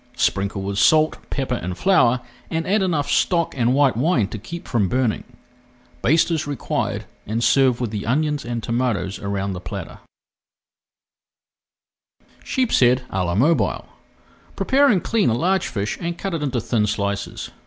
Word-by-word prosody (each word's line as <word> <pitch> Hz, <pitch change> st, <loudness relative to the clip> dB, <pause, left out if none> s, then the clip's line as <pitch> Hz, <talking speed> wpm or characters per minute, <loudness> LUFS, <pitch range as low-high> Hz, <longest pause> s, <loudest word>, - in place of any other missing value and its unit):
Sprinkle 100 Hz, 0 st, 0 dB
with 100 Hz, 0 st, -2 dB
salt, 155 Hz, +4 st, +4 dB
pepper, 135 Hz, -2 st, -2 dB
and 90 Hz, 0 st, -4 dB
flour, 125 Hz, -11 st, +3 dB, 0.3 s
and 165 Hz, 0 st, -2 dB
add 205 Hz, +3 st, +2 dB
enough 160 Hz, -7 st, 0 dB
stock 170 Hz, +3 st, +1 dB
and 125 Hz, 0 st, +2 dB
white 140 Hz, -4 st, +3 dB
wine 125 Hz, -, +2 dB
to 110 Hz, -, -6 dB
keep 170 Hz, +11 st, -8 dB
from 105 Hz, -6 st, +1 dB
burning. 125 Hz, -4 st, 0 dB, 0.8 s
Baste 160 Hz, +6 st, +3 dB
as 160 Hz, -3 st, -1 dB
required 145 Hz, -2 st, -2 dB, 0.2 s
and 115 Hz, +3 st, -1 dB
serve 130 Hz, -3 st, +3 dB
with 120 Hz, -4 st, -2 dB
the 105 Hz, -1 st, -4 dB
onions 150 Hz, +3 st, 0 dB
and 120 Hz, -1 st, -4 dB
tomatoes 115 Hz, -5 st, -1 dB
around 100 Hz, -1 st, -3 dB
the 90 Hz, -, -5 dB
platter. 90 Hz, -3 st, -7 dB, 2.4 s
SHEEPSHEAD 130 Hz, -, +2 dB
À 95 Hz, -1 st, 0 dB
LA 85 Hz, 0 st, -1 dB
MOBILE 150 Hz, +10 st, +1 dB, 0.7 s
Prepare 280 Hz, +2 st, +3 dB
and 205 Hz, -9 st, +3 dB
clean 225 Hz, -, +2 dB
a 115 Hz, -, +1 dB
large 185 Hz, +8 st, +1 dB
fish 105 Hz, -2 st, -3 dB
and 170 Hz, 0 st, -3 dB
cut 195 Hz, +1 st, -4 dB
it 165 Hz, -, -2 dB
into 135 Hz, -4 st, -1 dB
thin 115 Hz, -2 st, 0 dB
slices. 100 Hz, -1 st, -3 dB
125 Hz, 155 wpm, -21 LUFS, 105-160 Hz, 2.4 s, salt